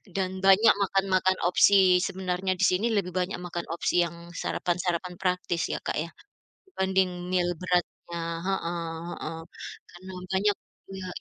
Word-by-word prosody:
Dan 190 -1 -2
banyak 195 +4 +6
makan-makan 190 -1 +2
opsi 185 0 +6
sebenarnya 185 0 -1
di 185 - -2
sini 190 +5 +2
lebih 200 -5 0
banyak 185 +1 -1
makan 175 -1 -5
opsi 175 +1 +2
yang 170 +1 -10
sarapan-sarapan 180 0 -2
praktis 180 -2 0
ya - - -1
Kak - - -2
ya, 170 - -5 0.6
dibanding 190 - 0
meal 175 -1 +1
beratnya. 175 -1 -2 0.3
Heeh 175 -3 -1 0.4
heeh. 160 +1 -5 0.5
Karena 185 +2 -11 0.2
banyak 200 +1 +2
gitu - - -26
ya 185 - -5
180 Hz, 140 wpm, -27 LUFS, 175-190 Hz, 0.6 s, banyak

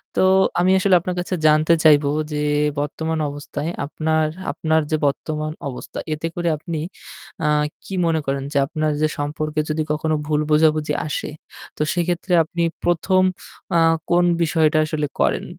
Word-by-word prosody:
তো - - +2 0.4
আমি 185 +2 +3
আসলে 190 -2 +4
আপনার 180 +1 -4
কাছে 180 +1 -2
জানতে 155 +2 +4
চাইবো 150 -2 +5 0.2
যে 150 0 -1 0.4
বর্তমান 160 +2 -2
অবস্থায় 145 +2 -5 0.2
আপনার, 155 +1 0 0.2
আপনার 160 0 +1
যে 155 - +2
বর্তমান 155 +2 -2 0.2
অবস্থা 125 - -7
এতে 155 +2 -3
করে 175 -1 0
আপনি 160 +1 -5 0.7
আ - - +3 0.4
কি - - -8
মনে 165 -1 +1
করেন 135 0 -1
যে - - +1
আপনার 155 -1 -1
যে 155 - +4
সম্পর্কে 155 +1 -2
যদি 155 0 0
কখনো 155 +1 0
ভুল 150 -1 +1
বোঝাবুঝি 155 -1 +3
আসে। 150 - -3 0.5
তো - - -4
সেক্ষেত্রে 175 +1 -1
আপনি 170 +2 -3 0.2
প্রথম 175 +2 +2 0.6
আ - - +5 0.3
কোন 175 0 +4 0.2
বিষয়টা 155 -1 +2
আসলে 150 -1 -2
করেন - - +1
155 Hz, 155 wpm, -21 LUFS, 150-170 Hz, 0.7 s, চাইবো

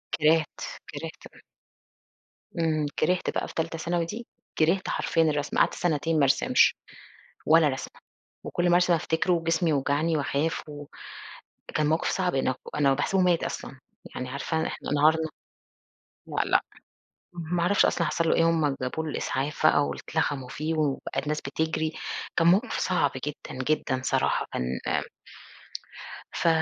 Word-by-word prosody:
كِرهْت، 155 0 +2 0.3
كِرهْت - - -7
ب - - -17 1.2
إمم. 155 -2 +1
كِرهْت 180 +3 +1
بقى - - -2
في - - -10
تالتة 165 0 -2
ثانوي 170 +1 -1
دي 220 +7 -7 0.3
كِرهْت 170 +5 +2
حرفيًا 165 - +1
الرسم، 150 -2 0
قعدت - - +4
سَنتين 165 -1 0
ما - - +4
أرسمش 135 - +4 0.7
ولا 160 0 +6
رسمة 130 - -6 0.4
وكل 175 0 0
ما 175 - +5
أرسم 175 0 +4
أفتكره 165 +2 +1
وجسمي 165 0 +1
يوجعني 150 +3 +1
وأخاف 150 +2 -1
و 145 0 -8 0.9
كان 150 -1 +2
موقف 160 +2 +1
صعب 180 -5 0
أن 130 -1 +1 0.2
أنا 140 -2 +3
باحسبه 185 +7 +1
مات 175 -2 +3
أصلًا. 135 - -5 0.4
يعني 125 0 -4
عارفة 160 +4 -2
إحنا - - -6
انهارنا 160 +2 +3 1.0
لأ، - - 0
لأ - - +3 0.7
ما 170 0 -2
أعرفش 200 +3 +4
أصلًا 170 - +1
حصل 165 -1 0
له - - +4
إيه، 165 - +4
هم 150 -4 +1
جابوا 160 +5 -2
له 155 - -3
الإسعاف 145 +3 -1
بقى 145 -2 +4
واتلخموا 145 -5 -2
فيه 155 +4 -3
وبقى 140 -3 -1
الناس 150 +1 -2
بتجري، 160 +2 -1 0.4
كان 165 - +3
موقف 200 +8 +3
صعب 160 -6 +2 0.2
جدًا، 130 -3 -5
جدًا 135 -3 0
صراحة - - +1
كان 65 +1 -2
آمم - - 0 1.3
ف - - 0
160 Hz, 150 wpm, -27 LUFS, 145-165 Hz, 1.3 s, ولا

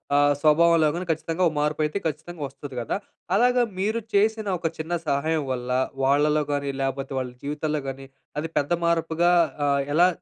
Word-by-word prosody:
ఆహ్, 145 0 +5
స్వభావంలో 160 0 +5
గానీ 180 +1 -3
ఖచ్చితంగా 165 +3 -1
ఒక 155 - -1
మార్పు 150 +1 0
అయితే 150 +6 -2
ఖచ్చితంగా 160 +2 -6
వస్తది 135 0 -10
గదా! 120 - -2 0.4
అలాగా 245 +2 +4 0.2
మీరు 215 +4 0
చేసిన 215 +1 +2
ఒక 165 - 0
చిన్న 160 +2 -4
సహాయం 150 +2 +1
వల్ల, 125 0 -4 0.3
వాళ్ళలో 150 +2 +3
గానీ 140 -1 -1
లేకపోతే 135 0 -2
వాళ్ళ 125 -1 -4
జీవితంలో 150 +1 -2
గానీ, 135 0 -7 0.3
అది 160 +2 -3
పెద్ద 145 +4 +1
మార్పుగా 170 +1 +2 0.4
ఆహ్, 140 0 +2
ఎలా 175 +2 +6
155 Hz, 165 wpm, -25 LUFS, 140-170 Hz, 0.4 s, ఎలా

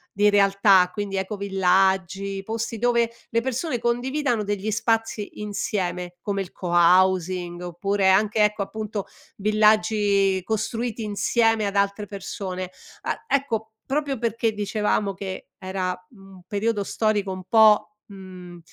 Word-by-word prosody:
di 205 +1 +4
realtà, 195 -2 +4
quindi 205 -2 -4
ecovillaggi, 195 0 0
posti 225 +2 -4
dove 235 0 +2 0.2
le 230 0 +1
persone 260 +2 -2
condividano 245 0 0
degli 205 +1 -2
spazi 225 -1 -1
insieme, 180 -4 -3
come 200 -1 -2
il 185 - -7
cohousing 180 0 +2
oppure 190 +3 0
anche 210 +3 +3
ecco, 210 0 +1
appunto, 210 -1 -5 0.3
villaggi 210 -2 +3
costruiti 225 +2 -2
insieme 215 +1 +1
ad 200 - -3
altre 200 +1 +1
persone. 185 -2 -6 0.3
A - - -4
ecco 225 -6 -1
proprio 280 -1 -1
perché 230 -1 0
dicevamo 210 -1 -1
che 190 -1 -7
era 185 -1 -3 0.2
un 195 -4 -15
periodo 205 0 -1
storico 205 -2 0
un 185 0 -6
po', 215 -1 +5
mhmm, 185 -3 -11
205 Hz, 120 wpm, -24 LUFS, 190-220 Hz, 0.3 s, po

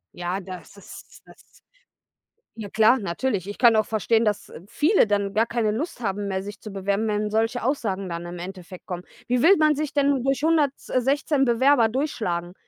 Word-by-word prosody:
Ja, 180 +2 -3
das 185 +1 -10
ist 200 - -13
das - - -20 1.0
na 205 -2 -6
klar, 220 +5 +4
natürlich. 200 0 -2
Ich 205 - -7
kann 235 -3 +6
auch 215 -1 +3
verstehen, 225 +1 +1
dass 210 -1 -2 0.2
viele 300 - +3
dann 200 -1 -1
gar 225 +1 +3
keine 230 -2 -1
Lust 245 +3 -4
haben 200 -1 -2
mehr, 190 -1 -2
sich 205 +1 -9
zu 215 - -9
bewerben, 200 +3 -1
wenn 210 0 -1
solche 225 +3 0
Aussagen 200 -8 -2
dann 170 0 -5
im 175 0 -7
Endeffekt 185 0 -9
kommen. 180 -1 -5 0.2
Wie 245 0 +1
will 385 +4 +6
man 305 -1 +4
sich 300 -1 -3
denn 280 -3 +2
durch 270 +1 0
116 285 -2 +1
Bewerber 240 0 +4
durchschlagen? 210 - -3
220 Hz, 180 wpm, -24 LUFS, 195-265 Hz, 1.0 s, kann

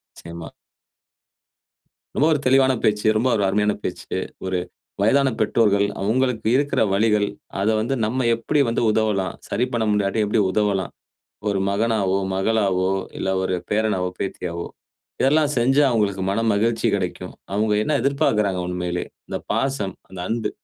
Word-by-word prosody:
நிச்சயமா. 85 -1 -9 1.6
ரொம்ப 145 - +3
ஒரு 150 - 0
தெளிவான 130 0 +4
பேச்சு, 105 0 +1
ரொம்ப 120 +4 +1
ஒரு 100 - +1
அருமையான 105 +2 +2
பேச்சு. - - -4 0.3
ஒரு 95 -1 -1 0.4
வயதான 135 +6 +4
பெற்றோர்கள் 105 -2 +3 0.2
அவுங்களுக்கு 115 +2 0
இருக்கிற 140 +1 +1
வலிகள், 105 0 +2 0.3
அத 100 - 0
வந்து 115 +5 -1
நம்ம 125 +3 -1
எப்படி 145 +6 -1
வந்து 115 - 0
உதவலாம், 105 -4 0
சரி 125 - +1
பண்ண 115 -2 +1
முடியாட்டியும் 105 +1 +1
எப்டி 105 +1 +2
உதவலாம். 100 -3 0 0.6
ஒரு 100 - 0
மகனாவோ, 100 -2 +1 0.2
மகளாவோ 95 -2 +1 0.3
இல்லை, 95 - -1
ஒரு 95 - 0
பேரனாவோ, 105 -4 0
பேத்தியாவோ 85 -3 -4 0.5
இதெல்லாம் 150 +2 +3
செஞ்சா 135 +5 +3
அவுங்களுக்கு 100 -5 0
மனமகிழ்ச்சி 110 +2 +1
கிடைக்கும். 95 -3 -3 0.2
அவுங்க 105 +1 +1
என்ன 150 - 0
எதிர்பாக்குறாங்க 110 -9 +1
உண்மையிலயே 90 0 -3 0.2
இந்த - - -3
பாசம், 135 -9 -1
அந்த 95 - -11
அன்பு. 115 0 -1
105 Hz, 135 wpm, -22 LUFS, 95-115 Hz, 1.6 s, தெளிவான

